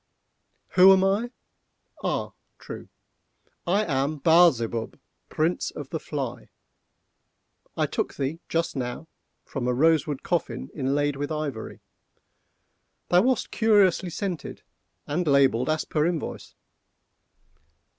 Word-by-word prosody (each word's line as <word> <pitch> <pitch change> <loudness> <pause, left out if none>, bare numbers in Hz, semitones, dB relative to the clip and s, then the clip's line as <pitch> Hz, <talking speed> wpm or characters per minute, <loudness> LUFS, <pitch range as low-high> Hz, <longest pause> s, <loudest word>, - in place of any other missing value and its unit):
"Who 185 +1 +7
am 190 0 +3
I?—ah, 210 +6 -4 0.3
true! - - -9 0.8
I 200 +5 +2
am 140 0 -1
Baal 170 +3 +6
Zebub, 115 -3 -4 0.3
Prince 160 +3 0
of 145 -3 -9
the 160 - -2
Fly. 140 -6 -5 1.3
I - - +2
took - - -3
thee, 140 +4 -3
just 165 0 -1
now, 125 +4 -4 0.4
from 130 -4 -4
a 125 - +1
rose 160 +3 +3
wood 145 -3 -4
coffin 175 -2 -2
inlaid 145 0 0
with 145 +2 -3
ivory. 150 -7 -4 1.3
Thou 180 +1 +5
wast 255 +4 0
curiously 205 -5 +3
scented, 180 -1 -5 0.4
and 165 +4 -2
labelled 135 -3 +3
as 155 0 0
per 150 0 +1
invoice. 170 -3 -4
155 Hz, 115 wpm, -25 LUFS, 135-180 Hz, 1.3 s, Who